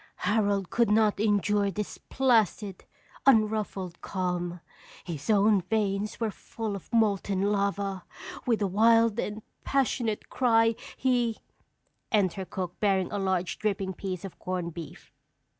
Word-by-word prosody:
"Harold 200 Hz, -2 st, +1 dB
could 235 Hz, -2 st, +2 dB
not 215 Hz, -1 st, +3 dB
endure 205 Hz, -1 st, +2 dB
this 210 Hz, +1 st, -5 dB
placid, 220 Hz, -6 st, +1 dB, 0.4 s
unruffled 215 Hz, -7 st, +2 dB
calm. 180 Hz, -2 st, -2 dB, 0.4 s
His 160 Hz, -2 st, -6 dB
own 205 Hz, -1 st, +4 dB
veins 205 Hz, +1 st, -1 dB
were 225 Hz, -2 st, 0 dB
full 220 Hz, 0 st, -5 dB
of 195 Hz, -, -10 dB
molten 200 Hz, -4 st, +2 dB
lava. 200 Hz, -2 st, -1 dB, 0.4 s
With 225 Hz, -3 st, +2 dB
a -, -, +2 dB
wild 225 Hz, +3 st, +4 dB
and 210 Hz, +1 st, -3 dB, 0.2 s
passionate 245 Hz, -5 st, 0 dB
cry 225 Hz, -3 st, +3 dB, 0.2 s
he 245 Hz, -3 st, +1 dB, 0.4 s
" -, -, -47 dB
_Enter 190 Hz, -3 st, +1 dB
cook 180 Hz, -2 st, -5 dB
bearing 195 Hz, -3 st, +1 dB
a 205 Hz, -, -2 dB
large, 185 Hz, -2 st, -1 dB
dripping 195 Hz, -3 st, -1 dB
piece 185 Hz, 0 st, -5 dB
of 195 Hz, -, -10 dB
corned 180 Hz, -2 st, -3 dB
beef. 165 Hz, -1 st, -10 dB
205 Hz, 130 wpm, -28 LUFS, 190-220 Hz, 0.4 s, own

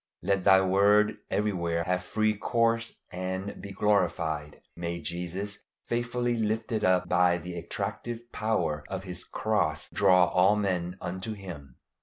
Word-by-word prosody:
Let 95 Hz, 0 st, +1 dB
Thy 95 Hz, -, +7 dB
word 105 Hz, +3 st, +4 dB
everywhere 85 Hz, -5 st, 0 dB
have 90 Hz, +1 st, -1 dB
free 110 Hz, +3 st, +1 dB
course 115 Hz, +2 st, 0 dB, 0.2 s
and 95 Hz, +2 st, -4 dB
be 100 Hz, -, -8 dB
glorified. 85 Hz, -7 st, 0 dB, 0.2 s
May 85 Hz, 0 st, -3 dB
Jesus, 90 Hz, +5 st, -4 dB, 0.3 s
faithfully 120 Hz, 0 st, -1 dB
"lifted 110 Hz, 0 st, -1 dB
up" 90 Hz, 0 st, +3 dB
by 90 Hz, 0 st, +3 dB
the 90 Hz, +1 st, -7 dB
attractive 105 Hz, +7 st, -5 dB
power 105 Hz, -9 st, -1 dB
of 95 Hz, -1 st, -4 dB
his 90 Hz, -2 st, -6 dB
cross, 105 Hz, -8 st, -1 dB
draw 90 Hz, -2 st, +5 dB
all 95 Hz, +3 st, +4 dB
men 90 Hz, -3 st, -1 dB
unto 95 Hz, +5 st, -4 dB
him. 85 Hz, -10 st, -9 dB
95 Hz, 135 wpm, -28 LUFS, 90-105 Hz, 0.3 s, Thy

